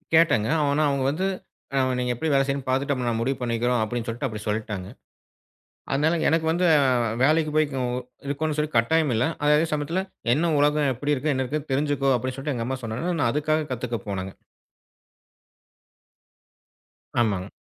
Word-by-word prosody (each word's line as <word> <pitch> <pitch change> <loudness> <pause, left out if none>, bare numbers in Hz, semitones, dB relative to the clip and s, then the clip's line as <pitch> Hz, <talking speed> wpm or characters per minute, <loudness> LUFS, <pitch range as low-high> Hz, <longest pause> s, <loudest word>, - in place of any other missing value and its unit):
கேட்டேங்க. 120 -10 +4
ஆவுனா 145 +1 +2
அவங்க 140 -1 0
வந்து, 185 +6 -2 0.5
"அ - - +3 0.2
நீங்க 125 0 0
எப்படி 160 +4 -1
வேல 135 0 +4
செய்றன்னு 135 -1 -2
பாத்துட்டு, 140 +2 +1
அப்புறம் 125 -2 -1
நான் 115 -1 -1
முடிவு 130 +2 0
பண்ணிக்கிறோம்." 120 0 0
அப்படின்னு 120 +2 -3
சொல்லிட்டு 120 +4 -2
அப்படி 105 -1 -7
சொல்லிட்டாங்க. 105 -3 -3 1.0
அதனால 155 +5 +2
எனக்கு 160 0 +2
வந்து 180 +2 0
அ - - +4 0.4
வேலைக்கு 155 +1 +3
போய்க்கு 150 -3 +1 0.5
இருக்கோணும்ன்னு 150 +2 -2
சொல்லி 150 0 -1
கட்டாயம் 150 +4 +3
இல்ல. 115 - +2 0.2
ஆனா 150 0 +2
அதே 165 - +2
சமயத்துல, 150 +5 -1 0.3
"என்ன 165 +3 +1
உலகம் 145 -1 +3
எப்படி 145 +4 0
இருக்கு? 145 +2 0
என்ன 130 0 0
இருக்குன்னு 150 +2 -4
தெரிஞ்சுக்கோ!" 140 -1 +1
அப்படி 130 +2 -4
சொல்லிட்டு 140 0 -3
எங்க 115 0 -2
அம்மா 130 0 -2
சொன்னாங்கன்னு, 160 +11 -2
நான் 115 - +3
அதுக்காக 155 +1 0
கத்துக்க 120 -1 -3
போனேங்க. 95 -1 -4 2.9
ஆமாங்க. 100 -4 0
135 Hz, 165 wpm, -25 LUFS, 120-150 Hz, 2.9 s, கேட்டேங்க